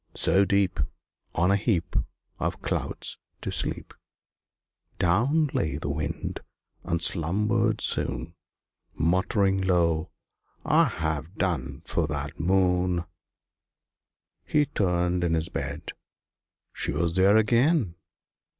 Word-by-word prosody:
So 100 +1 +4
deep, 100 -2 +1 0.6
On 90 +3 +3
a - - +4
heap 100 -4 -1 0.4
Of - - -3
clouds, - - +1 0.2
to - - -4
sleep, - - -2 1.0
Down 125 - +2
lay 75 -3 -1
the 70 -2 -3
Wind, 75 0 -4 0.4
and 85 -1 -1
slumbered 105 +6 +2
soon - - 0 0.6
Muttering 95 +3 +1
low, 85 -3 +1 0.6
"I've 80 +3 +1
done 85 -12 -2
for 85 -3 -1
that 75 +2 -5
Moon." 90 0 +2 1.4
He 150 -1 +2
turned 90 -5 0
in 85 -1 +1
his 80 +2 -1
bed; 70 +3 -5 0.8
she - - -1
was 85 +3 -1
there 95 +3 +5
again! 115 - +2
90 Hz, 105 wpm, -26 LUFS, 80-100 Hz, 1.4 s, there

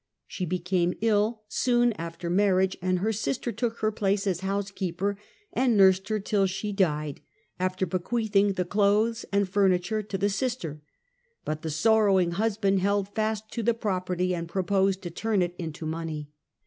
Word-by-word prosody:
She 180 - -4
became 180 0 0
ill 215 0 +1
soon 240 +1 +2
after 170 0 -6
marriage, 190 +1 +2
her 185 +4 0
sister 235 +3 -2
took 235 -1 -3
her 215 0 +2
place 200 -1 0
as 185 -4 0
house 195 +1 -2
keeper 195 +1 -2 0.4
and 245 -3 +2
nursed 190 0 +5
her 215 -1 0
till 200 -1 +1
she 200 +3 -3
died, 150 -7 0 0.4
after 185 +1 0
bequeathing 200 +2 +1
the 180 -1 -1
clothes 210 +4 +2
and 200 0 +2
furniture 190 +2 +2
to 205 -2 -4
the 200 +2 +1
sister; 195 - -3 0.6
but 155 0 -3
the 160 - -4
sorrowing 195 +1 +3
husband 200 0 +1
held 200 +1 +1
fast 220 0 -2
to 235 - -3
the 230 +1 +2
property 185 -4 -1
and 170 -1 -4
proposed 190 +1 +1
to 175 - -5
turn 210 +1 0
it 175 0 -3
into 160 -2 -5
money. 155 -2 -4
195 Hz, 160 wpm, -27 LUFS, 180-215 Hz, 0.6 s, nursed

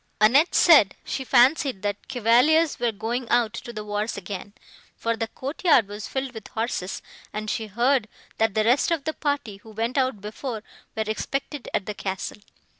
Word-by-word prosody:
Annette 265 +10 +5
said, 290 - +6
she 265 - -3
fancied 260 - +3
the 205 -1 0
Chevaliers 270 +6 +3
were 240 -1 +1
going 230 +4 -3
out 235 -3 +2
to 235 - -7
the 215 -2 -6
wars 210 +1 -2
again, 200 +1 -7 0.4
for 230 0 -1
the 225 0 -2
courtyard 275 - +2
was 205 +1 -7
filled 265 -1 -3
with 220 -2 -9
horses, 220 -5 -3 0.3
and 215 0 -3
she 220 - -3
heard, 240 +3 +2 0.3
that 225 -2 +2
the 215 - +3
rest 245 +8 +3
of 330 -4 0
the 315 - -2
party, 285 -10 -2
who 220 - -16
went 230 +5 -1
out 255 -5 0
before, 215 +2 -6 0.3
were 220 - +1
expected 275 +5 -3
at 190 - -1
the 210 - -4
castle. 195 +1 -5
230 Hz, 180 wpm, -25 LUFS, 210-270 Hz, 0.4 s, said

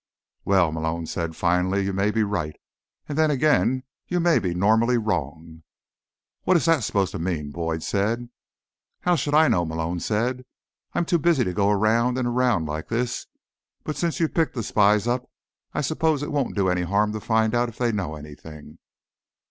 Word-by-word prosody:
"Well," 95 -5 +3
Malone 80 +1 -2
said 85 0 -4
finally, 90 +3 +1
"you 100 - -2
may 95 +2 +1
be 110 +1 +1
right. 95 -7 -2 0.5
And 145 - -4
then 155 0 +3
again, 135 -2 +2 0.2
you 180 - 0
may 170 -1 +3
be 90 -2 -2
normally 110 +6 +3
wrong." 80 - -3 0.8
"What 185 - +3
is 155 - -1
that 165 -6 +3
supposed 100 -2 0
to 100 - -5
mean?" 80 -4 -3
Boyd 80 0 -3
said. 115 +4 -1 0.7
"How 175 0 +2
should 145 -2 0
I 160 +1 +6
know?" 90 - +2
Malone 80 +1 -3
said. 120 +7 -1 0.5
"I'm 175 - +1
too 170 0 +1
busy 155 -4 +3
to 90 - -2
go 100 +2 +2
around 115 +5 +2
and 125 -1 0
around 120 -8 +1
like 75 +1 -4
this. 120 +1 -2 0.6
But 155 - -4
since 170 -2 -1
you've 165 -2 0
picked 165 -4 0
the 115 - -2
spies 105 0 +3
up, 125 +1 -1 0.4
I - - -2
suppose 155 0 0
it - - -4
won't 145 -3 -1
do 100 -2 +1
any 90 -1 +1
harm 100 +4 +1
to 110 - -3
find 110 0 +1
out 120 0 +1
if 110 - -14
they 120 -2 +1
know 95 -8 -3
anything." 75 +1 -12
105 Hz, 190 wpm, -24 LUFS, 85-125 Hz, 0.8 s, I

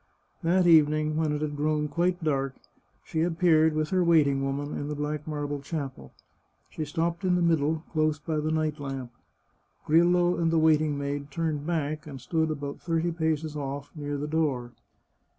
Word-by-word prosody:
That 180 +2 +3
evening, 155 -2 +4
when 155 -1 +1
it 150 0 -2
had 150 -1 -3
grown 150 +1 0
quite 175 +2 0
dark, 135 -3 0 0.5
she 160 - -1
ap« 165 -1 -1
peared, 160 -3 +4
with 155 0 0
her 185 -1 +3
waiting 145 -5 +3
woman, 140 +2 -2
in 145 - -4
the 150 - -3
black 150 +1 -3
marble 145 -1 -3
chapel. 140 - -6 0.6
She 155 - -4
stopped 165 +4 -2
in 180 -1 +3
the 180 - +1
middle, 160 -1 +1
close 155 -1 +2
by 155 +1 -3
the 150 +1 -1
night 155 -1 -1
lamp. 135 -3 -5 0.7
Grillo 175 +2 +4
and 165 -1 +2
the 165 - +2
waiting 155 -2 +3
maid 140 0 -3
turned 155 -1 -2
back, 155 -2 -2
and 140 -3 -8
stood 160 +5 0
about 145 -2 -5
thirty 165 0 0
paces 160 -2 -1
off, 140 -1 -5
near 145 -1 -3
the 145 - -3
door. 145 -6 -1
155 Hz, 180 wpm, -27 LUFS, 145-160 Hz, 0.7 s, evening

